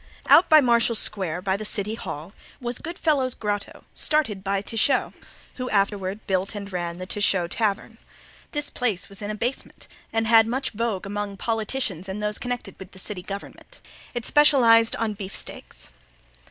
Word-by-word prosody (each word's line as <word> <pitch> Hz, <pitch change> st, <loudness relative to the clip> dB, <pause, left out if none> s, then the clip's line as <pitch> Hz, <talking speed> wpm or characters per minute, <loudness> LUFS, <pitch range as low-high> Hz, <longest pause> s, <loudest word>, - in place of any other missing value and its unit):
Out 345 Hz, -, +6 dB
by 310 Hz, -1 st, +8 dB
Marshall 235 Hz, -2 st, +3 dB
Square, 185 Hz, -5 st, 0 dB
by 190 Hz, -1 st, +1 dB
the 210 Hz, -, -4 dB
City 210 Hz, 0 st, +2 dB
Hall, 170 Hz, -5 st, -7 dB, 0.3 s
was 240 Hz, 0 st, -3 dB
Good 335 Hz, +3 st, -6 dB
Fellow's 275 Hz, -6 st, +1 dB
Grotto, 205 Hz, -1 st, -4 dB
started 245 Hz, -11 st, 0 dB
by 195 Hz, 0 st, -1 dB
Techau, 235 Hz, +5 st, +1 dB, 0.4 s
who 255 Hz, -1 st, -3 dB
afterward 200 Hz, 0 st, 0 dB
built 190 Hz, +2 st, 0 dB
and 200 Hz, -1 st, -7 dB
ran 175 Hz, -1 st, -3 dB
the 185 Hz, -, -6 dB
Techau 190 Hz, -2 st, +2 dB
Tavern. 220 Hz, +3 st, -2 dB, 0.5 s
This 295 Hz, -1 st, -2 dB
place 220 Hz, -7 st, -2 dB
was 200 Hz, +1 st, -6 dB
in 205 Hz, -, -4 dB
a 215 Hz, -, -2 dB
basement 240 Hz, +5 st, -4 dB, 0.2 s
and 225 Hz, 0 st, 0 dB
had 225 Hz, 0 st, +6 dB
much 260 Hz, +4 st, -2 dB
vogue 215 Hz, -3 st, -2 dB
among 205 Hz, 0 st, -4 dB
politicians 220 Hz, -5 st, -2 dB
and 190 Hz, +2 st, -4 dB
those 210 Hz, 0 st, -1 dB
connected 245 Hz, -1 st, -5 dB
with 190 Hz, -1 st, -11 dB
the -, -, -13 dB
city 190 Hz, 0 st, -5 dB
government. 200 Hz, -, -9 dB, 0.4 s
It 240 Hz, -1 st, -3 dB
specialized 240 Hz, -6 st, +5 dB
on 225 Hz, -2 st, -1 dB
beefsteaks. 195 Hz, -2 st, -6 dB
210 Hz, 165 wpm, -24 LUFS, 195-240 Hz, 0.5 s, by